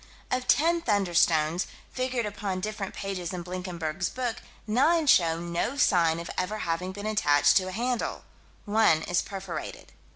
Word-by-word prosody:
Of 255 0 -1
ten 335 +3 +3
"thunderstones," 175 - +2 0.3
figured 255 -2 -1
upon 200 -2 -3
different 210 0 -4
pages 190 -3 -4
in 180 -1 -4
Blinkenberg's 180 -1 -3
book, 245 -3 -3 0.3
nine 295 +9 +3
show 165 - +4
no 170 +10 -2
sign 170 - +3
of 170 - -6
ever 190 +4 -2
having 170 +3 -2
been 205 +2 -7
attached 145 -9 +3
to 185 - +1
a - - -4
handle: 240 +4 -2 0.4
one 205 -7 +3
is 175 - +1
perforated. 190 -3 -7
190 Hz, 150 wpm, -27 LUFS, 170-225 Hz, 0.4 s, show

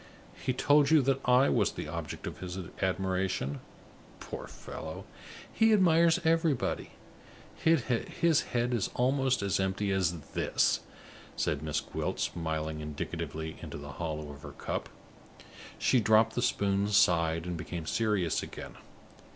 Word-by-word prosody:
"He 130 - -2
told 145 +3 +4
you 155 -3 +6
that 135 +1 +2
I 125 +2 +6
was 110 -5 +2
the - - -5
object 80 -1 -5
of - - -6
his 90 0 -6 0.2
admiration? 95 -6 -1 0.6
Poor - - -7
fellow, - - -8 0.5
he 225 0 +4
admires 170 -4 +5
everybody; 160 -4 +1 0.6
his 160 +2 +2
head 120 0 -1
is 115 -5 0
almost 130 -2 +2
as 100 -1 +1
empty 95 +1 0
as 90 -3 +1
this," - - +2 0.6
said 75 -2 -1
Miss 75 -1 -1
Gwilt, - - -4
smiling 80 -2 -2
indicatively 75 +1 -5
into - - -7
the 70 -1 -8
hollow 75 -3 -3
of 70 0 -12
her - - -9
cup. - - -4 0.9
She 130 - +3
dropped 110 +1 +4
the 120 - -1
spoon, 100 -4 +1
sighed, 85 -5 +3
and 90 -1 -3
became 85 0 -5
serious 105 -5 +1
again. - - -8
100 Hz, 135 wpm, -30 LUFS, 80-130 Hz, 0.9 s, you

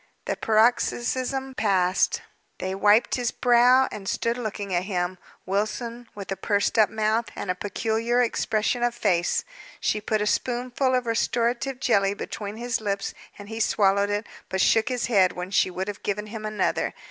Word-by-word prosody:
The - - -1
paroxysm 245 +4 +1
passed. 190 -5 +1 0.3
They 190 0 -3
wiped 205 +4 +4
his 245 -2 0
brow, 250 +2 +4
and 195 -2 -5
stood 230 0 0
looking 210 -5 -4
at 175 +1 0
him; 180 -2 -2 0.3
Wilson 230 +5 -2
with 200 -1 -7
a - - 0
pursed 205 +3 0
up 215 - +6
mouth, 220 +1 0
and 185 - -2
a - - 0
peculiar 225 +5 -1
expression 230 -1 0
of 240 0 +1
face. 180 -7 +1 0.4
She 215 - 0
put 215 +1 0
a 210 - 0
spoonful 250 +3 0
of 250 -1 0
restorative 235 +3 0
jelly 200 -5 +2
between 205 +1 -6
his 240 -1 -2
lips, 200 -2 -2 0.2
and 205 - -10
he 225 +1 -6
swallowed 200 -2 +2
it, 205 +1 -1 0.2
but 190 - -2
shook 220 +5 +3
his 250 -2 -1
head 190 -6 +3
when 180 +1 -6
she 190 - +3
would 185 +2 -4
have 205 -1 -6
given 210 +1 -2
him 215 0 -6
another. 215 0 -1
215 Hz, 170 wpm, -25 LUFS, 200-240 Hz, 0.4 s, up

